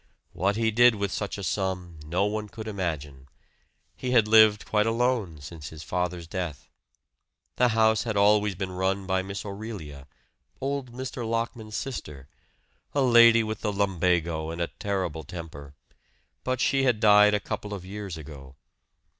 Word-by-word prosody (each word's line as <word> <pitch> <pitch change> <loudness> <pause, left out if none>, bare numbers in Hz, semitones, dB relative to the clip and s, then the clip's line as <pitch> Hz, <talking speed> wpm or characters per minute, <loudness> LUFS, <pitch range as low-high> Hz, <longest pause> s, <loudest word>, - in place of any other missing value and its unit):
What 100 +3 0
he 110 0 +1
did 120 +1 +6
with 100 -2 -2
such 105 -1 -3
a 100 - -6
sum 90 -4 -3
no 90 +6 0
one 105 0 -3
could 110 +1 -8
imagine; 75 -9 -4 0.7
he 125 - -4
had 115 -4 +4
lived 105 -3 +6
quite 105 +2 +1
alone 115 -8 0
since 75 +1 -8
his 80 -1 -10
father's 90 +1 -2
death. 85 -4 -5 0.9
The 125 - +4
house 110 -1 +3
had 110 -4 -2
always 105 0 +4
been 95 0 -4
run 95 +1 -1
by 95 0 +1
Miss 100 +2 -6
Aurelia, 100 -10 -7 0.5
old 135 -2 -3
Mr. 125 0 -5
Lockman's 115 -1 -3
sister, 75 - -6 0.7
a 140 - +3
lady 115 -2 +7
with 110 -1 -4
the 105 - -1
lumbago 90 -5 0
and 85 +1 -6
a 85 - -1
terrible 95 -6 -2
temper; 75 -3 -9 0.7
but 130 0 -1
she 135 +1 +2
had 125 -5 +2
died 105 -1 +6
a - - +1
couple 105 0 -5
of 95 -3 -6
years 100 -3 -6
ago. 70 -3 -11
100 Hz, 160 wpm, -26 LUFS, 85-110 Hz, 0.9 s, lady